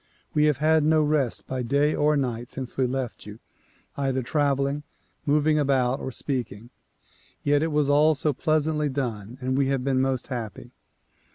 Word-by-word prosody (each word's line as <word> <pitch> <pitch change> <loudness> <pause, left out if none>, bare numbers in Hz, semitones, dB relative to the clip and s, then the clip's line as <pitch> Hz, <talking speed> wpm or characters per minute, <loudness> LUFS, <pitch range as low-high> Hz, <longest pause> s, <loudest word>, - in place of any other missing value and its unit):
We 150 0 +3
have 150 -3 +2
had 155 +1 +3
no 155 0 +4
rest 145 -5 0
by 130 -1 -3
day 140 +5 +2
or 150 0 +2
night 120 -3 -2
since 130 -2 -7
we 130 -1 +1
left 130 -4 -4
you; 105 +1 -9 0.6
either 135 -2 -1
traveling, 140 +1 0 0.5
moving 150 +1 +3
about 135 -2 +1
or 130 - -5
speaking; 120 -4 -4 0.7
yet 145 0 +3
it 160 0 0
was 150 -1 +2
all 150 +2 +4
so 145 +2 0
pleasantly 155 0 0
done 120 -4 -4
and 130 +1 -1
we 135 0 +2
have 135 -2 0
been 130 -1 +1
most 130 -1 -1
happy. 115 -6 -6
140 Hz, 170 wpm, -25 LUFS, 125-150 Hz, 0.7 s, no